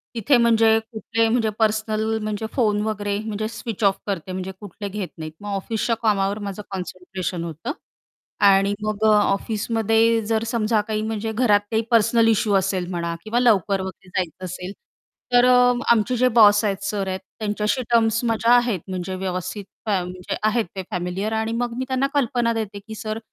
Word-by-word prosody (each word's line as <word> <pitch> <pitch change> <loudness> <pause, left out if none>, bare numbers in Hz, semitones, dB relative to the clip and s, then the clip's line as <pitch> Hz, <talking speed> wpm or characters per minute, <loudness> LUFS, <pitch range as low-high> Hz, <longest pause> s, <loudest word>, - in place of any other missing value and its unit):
तिथे 245 +4 +3
म्हणजे 225 -1 +4
कुठले 225 +1 0
म्हणजे 225 -1 +1
पर्सनल 220 0 +1
म्हणजे 215 0 -3
फोन 210 -5 +1
वगैरे 205 -2 -2
म्हणजे 215 0 -3
स्विच 225 -1 -6
ऑफ 195 -1 +4
करते 190 -2 -3
म्हणजे 185 +1 -4
कुठले 205 0 -7
घेत 200 -2 -4
नाहीत. 155 -1 -6
मग 205 - -8
ऑफिसच्या 225 +4 -1
कामावर 200 -1 +1
माझं 200 -1 -5
कॉन्सन्ट्रेशन 185 -1 -5
होतं 165 - -5 0.8
आणि 195 0 +4
मग 215 0 -2
अ, 215 - +6
ऑफिसमध्ये 225 +2 +1
जर 220 +1 0
समजा 220 -1 +1
काही 215 -1 -1
म्हणजे 220 0 -3
घरात 220 -2 +3
काही 220 0 +2
पर्सनल 230 0 +4
इश्यू 215 -1 +2
असेल 190 -2 0
म्हणा 170 -1 -2
किंवा 225 +2 0
लवकर 200 -5 +3
वगैरे 190 0 -8
जायचं, 185 -1 -3
असेल 180 +1 -6 0.6
तर 245 0 +6
अ, 250 0 +5 0.2
आमचे 235 +2 +3
जे 255 +2 +4
बॉस 210 -2 +7
आहेत, 195 -1 -2
सर 200 -1 -2
आहेत, 190 0 -2 0.2
त्यांच्याशी 210 +3 -1
टर्म्स 230 0 +3
माझ्या 230 0 +2
आहेत 240 -5 +2
म्हणजे 185 0 -4
व्यवस्थित 185 +1 -4 0.2
फ्या 200 -4 +1
म्हणजे 180 0 -5
आहेत 215 +1 +2
ते 190 - -3
फॅमिलिअर 180 +4 -2
आणि 220 0 -1
मग 240 0 -2
मी 260 - -2
त्यांना 260 +1 +1
कल्पना 240 -4 +1
देते, 215 -3 -4
की 220 +2 -10
"सर 215 0 -4
215 Hz, 175 wpm, -22 LUFS, 195-225 Hz, 0.8 s, बॉस